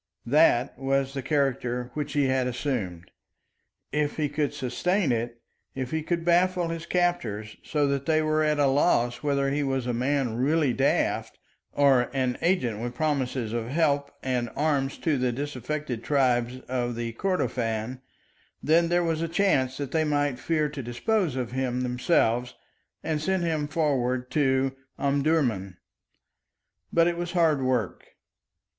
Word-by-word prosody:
That 130 Hz, -2 st, +3 dB
was 135 Hz, 0 st, 0 dB
the 135 Hz, -, -3 dB
character 125 Hz, -3 st, -1 dB
which 145 Hz, -1 st, -4 dB
he 145 Hz, -1 st, +2 dB
had 130 Hz, -1 st, +1 dB
assumed. 110 Hz, -, -3 dB, 0.8 s
If 150 Hz, 0 st, -1 dB
he 150 Hz, -2 st, 0 dB
could 145 Hz, 0 st, -1 dB
sustain 165 Hz, +6 st, 0 dB
it, 120 Hz, 0 st, -3 dB, 0.3 s
if 130 Hz, -2 st, -4 dB
he 160 Hz, -, -1 dB
could 170 Hz, +1 st, -2 dB
baffle 175 Hz, 0 st, +3 dB
his 165 Hz, 0 st, -5 dB
captors, 115 Hz, -, -1 dB
so 150 Hz, -1 st, 0 dB
that 140 Hz, -1 st, -2 dB
they 155 Hz, -1 st, +3 dB
were 155 Hz, 0 st, +2 dB
at 150 Hz, -1 st, +2 dB
a 145 Hz, -, +3 dB
loss 130 Hz, -3 st, +2 dB
whether 140 Hz, -2 st, +1 dB
he 145 Hz, +1 st, 0 dB
was 135 Hz, -3 st, -1 dB
a 125 Hz, -, -1 dB
man 125 Hz, -1 st, 0 dB
really 145 Hz, +1 st, +2 dB
daft 135 Hz, +2 st, 0 dB, 0.3 s
or 135 Hz, -4 st, +3 dB
an 130 Hz, -2 st, 0 dB
agent 130 Hz, -, +1 dB
with 120 Hz, +1 st, -4 dB
promises 130 Hz, -6 st, -1 dB
of 115 Hz, -1 st, -2 dB
help 140 Hz, 0 st, +1 dB
and 125 Hz, -2 st, -1 dB
arms 140 Hz, -2 st, 0 dB
to 150 Hz, -5 st, 0 dB
the 125 Hz, -1 st, +1 dB
disaffected 140 Hz, -1 st, -4 dB
tribes 125 Hz, -2 st, +1 dB
of 120 Hz, -2 st, -2 dB, 0.2 s
Kordofan 125 Hz, -, -1 dB, 0.6 s
then 165 Hz, +2 st, +3 dB
there 175 Hz, 0 st, +2 dB
was 165 Hz, -1 st, 0 dB
a 165 Hz, -, 0 dB
chance 150 Hz, -8 st, +1 dB
that 140 Hz, -2 st, -4 dB
they 160 Hz, -1 st, +2 dB
might 145 Hz, -4 st, 0 dB
fear 155 Hz, 0 st, 0 dB
to 145 Hz, -2 st, -6 dB
dispose 150 Hz, -, 0 dB
of 125 Hz, -3 st, -3 dB
him 125 Hz, -1 st, -1 dB
themselves 125 Hz, -1 st, +1 dB, 0.5 s
and 155 Hz, -2 st, -1 dB
send 190 Hz, +2 st, 0 dB
him 155 Hz, -3 st, 0 dB
forward 130 Hz, -5 st, 0 dB
to 135 Hz, -2 st, +1 dB, 0.2 s
Omdurman. 140 Hz, -, 0 dB, 1.1 s
But 165 Hz, 0 st, +4 dB
it 175 Hz, 0 st, 0 dB
was 175 Hz, 0 st, -4 dB
hard 160 Hz, -5 st, +3 dB
work. 125 Hz, -6 st, -2 dB
140 Hz, 150 wpm, -26 LUFS, 125-155 Hz, 1.1 s, But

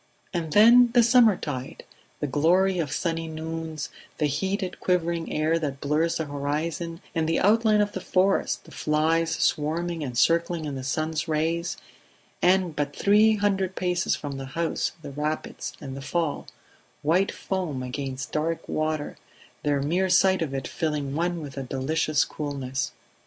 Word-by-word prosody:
And 165 Hz, -3 st, -2 dB
then, 240 Hz, +3 st, +7 dB
the 240 Hz, -1 st, +6 dB
summertide; 210 Hz, -, +2 dB, 0.4 s
the -, -, +1 dB
glory 175 Hz, +7 st, +2 dB
of 150 Hz, -5 st, -2 dB
sunny 165 Hz, +2 st, -2 dB
noons, 160 Hz, -1 st, -5 dB, 0.3 s
the 150 Hz, -, +1 dB
heated 190 Hz, +7 st, -2 dB
quivering 170 Hz, -2 st, 0 dB
air 155 Hz, +2 st, +1 dB
that 140 Hz, -4 st, -3 dB
blurs 155 Hz, +4 st, +1 dB
the 160 Hz, -, -2 dB
horizon 155 Hz, +4 st, -3 dB
and 160 Hz, -1 st, 0 dB
the 165 Hz, -, +2 dB
outline 215 Hz, +1 st, +4 dB
of 205 Hz, 0 st, 0 dB
the 190 Hz, -, -5 dB
forest, 190 Hz, +2 st, +1 dB
the -, -, -16 dB
flies 160 Hz, +2 st, +1 dB
swarming 165 Hz, +2 st, 0 dB
and 125 Hz, -4 st, -4 dB
circling 170 Hz, +2 st, +2 dB
in 145 Hz, -, -4 dB
the 135 Hz, -1 st, -5 dB
sun's 155 Hz, +4 st, -1 dB
rays, 165 Hz, +2 st, -1 dB, 0.6 s
and 180 Hz, -3 st, +3 dB
but 145 Hz, -1 st, -2 dB
three 215 Hz, +2 st, +5 dB
hundred 195 Hz, -2 st, 0 dB
paces 180 Hz, 0 st, 0 dB
from 140 Hz, -2 st, -6 dB
the 135 Hz, 0 st, -6 dB
house 165 Hz, -1 st, 0 dB
the 145 Hz, -, -7 dB
rapids 150 Hz, +2 st, -3 dB
and 135 Hz, -1 st, -7 dB
the 135 Hz, -, -7 dB
fall 165 Hz, +1 st, -2 dB, 0.6 s
white 175 Hz, +6 st, +2 dB
foam 175 Hz, -9 st, -3 dB
against 130 Hz, 0 st, -5 dB
dark 160 Hz, +2 st, -2 dB
water 155 Hz, -1 st, -2 dB, 0.4 s
the 145 Hz, -1 st, +1 dB
mere 180 Hz, +7 st, +1 dB
sight 190 Hz, 0 st, +4 dB
of 155 Hz, -4 st, -1 dB
it 135 Hz, -, -3 dB
filling 150 Hz, -4 st, -2 dB
one 170 Hz, +2 st, -1 dB
with 140 Hz, -2 st, -8 dB
a -, -, -2 dB
delicious 145 Hz, +3 st, 0 dB
coolness. 135 Hz, -3 st, -3 dB
160 Hz, 155 wpm, -26 LUFS, 145-180 Hz, 0.6 s, then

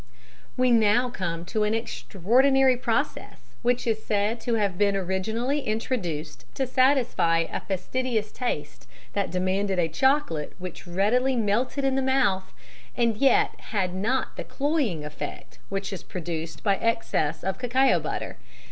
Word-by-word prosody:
_ -, -, -23 dB, 0.5 s
We 255 Hz, 0 st, +3 dB
now 235 Hz, +2 st, +4 dB
come 170 Hz, -5 st, -3 dB
to 215 Hz, +4 st, -2 dB
an 210 Hz, +1 st, +2 dB
extraordinary 245 Hz, -, +2 dB
process 250 Hz, -, -2 dB, 0.2 s
which 245 Hz, +1 st, +1 dB
is 220 Hz, -2 st, 0 dB
said 210 Hz, +2 st, 0 dB
to 235 Hz, 0 st, 0 dB
have 200 Hz, -4 st, 0 dB
been 200 Hz, +1 st, +2 dB
originally 220 Hz, +9 st, -1 dB
introduced 185 Hz, -, -3 dB
to 270 Hz, -, 0 dB
satisfy 255 Hz, -10 st, +3 dB
a -, -, -1 dB
fastidious 220 Hz, +3 st, -2 dB
taste 150 Hz, -12 st, -4 dB, 0.3 s
that 200 Hz, -1 st, 0 dB
demanded 190 Hz, +1 st, 0 dB
a 170 Hz, -2 st, +2 dB
chocolate 215 Hz, -, +1 dB
which 180 Hz, -1 st, -8 dB
readily 230 Hz, +9 st, +2 dB
melted 235 Hz, +5 st, 0 dB
in 270 Hz, -1 st, +2 dB
the 270 Hz, -, +1 dB
mouth 255 Hz, -8 st, +1 dB, 0.5 s
and 235 Hz, -2 st, +2 dB
yet 270 Hz, +2 st, +4 dB
had 190 Hz, -4 st, -2 dB
not 225 Hz, +8 st, -1 dB
the -, -, -3 dB
cloying 275 Hz, -, -1 dB
effect 150 Hz, 0 st, -7 dB
which 195 Hz, +1 st, -3 dB
is 190 Hz, -, -5 dB
produced 165 Hz, -2 st, -5 dB
by 200 Hz, -2 st, +3 dB
excess 225 Hz, -9 st, 0 dB
of 190 Hz, +4 st, -2 dB
cacao 255 Hz, +2 st, +3 dB
butter. -, -, -4 dB
215 Hz, 145 wpm, -26 LUFS, 185-255 Hz, 0.5 s, now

